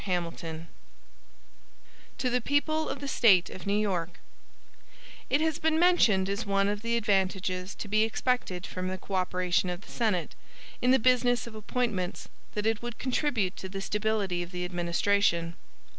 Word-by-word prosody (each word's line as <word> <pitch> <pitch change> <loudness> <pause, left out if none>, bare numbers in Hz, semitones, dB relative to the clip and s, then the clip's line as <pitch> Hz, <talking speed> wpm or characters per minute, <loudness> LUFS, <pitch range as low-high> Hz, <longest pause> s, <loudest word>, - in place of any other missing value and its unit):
HAMILTON 170 -3 -3 1.5
To 255 -2 0
the 250 0 +1
People 310 +4 +1
of 280 - -5
the 280 - -4
State 200 -9 +4
of 185 - -9
New 200 +1 +2
York: 180 -5 -1 1.1
IT 285 - +2
HAS 320 -1 0
been 320 0 +2
mentioned 240 - +4
as 200 +3 -2
one 195 -1 +1
of 205 0 -2
the 230 +1 0
advantages 190 -3 0
to - - -6
be 215 +1 +2
expected 220 -5 0
from 185 0 -4
the 185 0 -3
co 195 - -9
operation 185 -1 +1
of 180 +1 -4
the - - -14
Senate, 210 -8 0 0.5
in 250 - +2
the 260 - +6
business 245 -1 +3
of 235 - -9
appointments, 215 -4 -2 0.3
that 210 0 -2
it 225 -1 +1
would 240 -1 -6
contribute 250 -7 0
to 190 - -6
the 195 +1 -5
stability 205 -3 -1
of 175 - -5
the 180 -1 -4
administration. 175 0 +1
200 Hz, 165 wpm, -29 LUFS, 185-240 Hz, 1.5 s, the